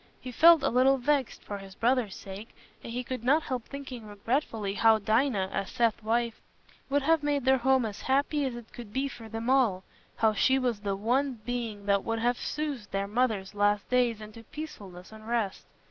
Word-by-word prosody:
He 255 - -7
felt 325 +4 +7
a - - +3
little 260 +3 +4
vexed, 270 0 0
for 205 -1 -6
his 195 -1 -12
brother's 235 -4 +1
sake, 195 +3 -9 0.3
and - - -7
he 250 +2 -3
could 250 -1 -5
not 295 +6 +3
help 250 -3 -4
thinking 260 -5 -8
regretfully 210 -1 -2
how 225 +1 +5
Dinah, 215 -2 +1
as 195 0 -2
Seth's 230 -1 +1
wife, 230 +1 -1 0.5
would 285 0 +1
have 325 +1 +3
made 290 -3 0
their 265 0 +4
home 260 0 +3
as 210 -2 -6
happy 285 +2 +1
as 255 -3 -3
it 240 -2 -11
could 235 -4 -9
be 265 +5 -1
for 230 -4 -10
them 225 +1 -5
all—how 225 -3 +1
she 260 +5 +3
was 245 -5 0
the 200 -1 -2
one 245 +4 0
being 230 -4 -4
that 200 -1 +2
would 225 0 -1
have 240 +2 0
soothed 285 -9 -4
their 195 0 -1
mother's 215 -4 0
last 205 0 +1
days 240 -3 +2
into 215 +2 -10
peacefulness 200 - -9
and 220 0 -12
rest. 230 -5 -2
235 Hz, 195 wpm, -28 LUFS, 210-265 Hz, 0.5 s, felt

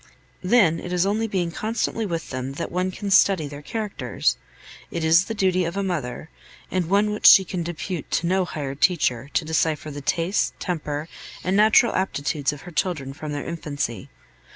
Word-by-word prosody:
Then 185 -5 +4
it 180 - -7
is 180 0 +2
only 215 +3 0
in - - -5
being 180 -4 -1
constantly 225 +2 -2
with 165 -3 -4
them 130 +1 -4
that 170 - -5
one 185 +1 0
can 200 +2 -5
study 190 -5 +4
their 145 0 -9
characters. 215 +6 -2 0.5
It 170 - -4
is 165 +3 +5
the 225 - -4
duty 185 -3 +2
of 170 +3 -3
a 200 - 0
mother, 160 -5 -4 0.4
and 180 -3 -1
one 205 +2 +3
which 210 - +3
she 190 - +9
can 180 0 -3
depute 175 0 -5
to 170 - 0
no 185 +2 +2
hired 140 -5 -5
teacher, 140 -8 +2
to 165 - +1
decipher 155 -1 0
the 145 0 -7
tastes, 170 +7 0
temper, 150 -4 -3 0.4
and 185 +1 0
natural 215 +3 +5
aptitudes 145 -6 -1
of 150 - -9
her 175 - -10
children 155 -6 -2
from 150 +1 -7
their 145 -1 -4
infancy. 145 - -4
170 Hz, 190 wpm, -23 LUFS, 150-190 Hz, 0.5 s, she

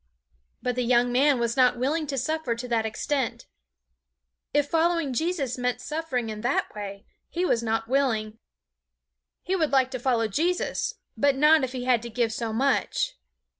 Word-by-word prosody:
But 250 - 0
the 250 - -1
young 245 0 +3
man 275 +2 +4
was 235 0 0
not 250 -2 +4
willing 300 +5 0
to 275 -1 -3
suffer 275 -2 -1
to 245 +2 -6
that 225 -2 +1
extent. 260 +3 -2 1.1
If 290 0 +2
following 330 -3 +1
Jesus 280 -4 -1
meant 250 0 0
suffering 295 -7 -3
in 215 0 -6
that 245 +4 0
way, 200 -1 -7 0.2
he 355 +2 -1
was 235 -9 +2
not 225 0 -1
willing. 225 -5 0 1.0
He 375 - 0
would 320 -5 +1
like 260 -1 +3
to 255 - -4
follow 235 -3 +1
Jesus, 335 - -1 0.2
but 280 -1 +3
not 300 +2 +5
if 260 0 -2
he 250 -1 -4
had 250 -3 +3
to 235 - -7
give 230 -1 0
so 230 -1 -3
much. 265 +5 0
255 Hz, 170 wpm, -26 LUFS, 235-290 Hz, 1.1 s, not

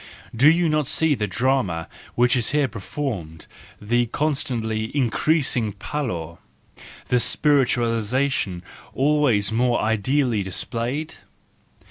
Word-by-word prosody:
Do 135 +6 +6
you 170 +1 +3
not 150 -3 +1
see 160 +1 +3
the 105 -6 -2
drama 105 -6 0 0.3
which 125 +1 +3
is 120 -3 +1
here 145 -1 +2
performed, 100 - -5 0.3
the 120 +3 0
constantly 115 -6 -2
increasing 130 -3 +1
pallor 95 - -5 0.3
—, - - -18
the 125 - +3
spiritualisation 120 - +1 0.3
always 135 -8 +2
more 120 +1 +1
ideally 110 +2 +1
displayed? 120 - -3
120 Hz, 105 wpm, -22 LUFS, 110-140 Hz, 0.3 s, Do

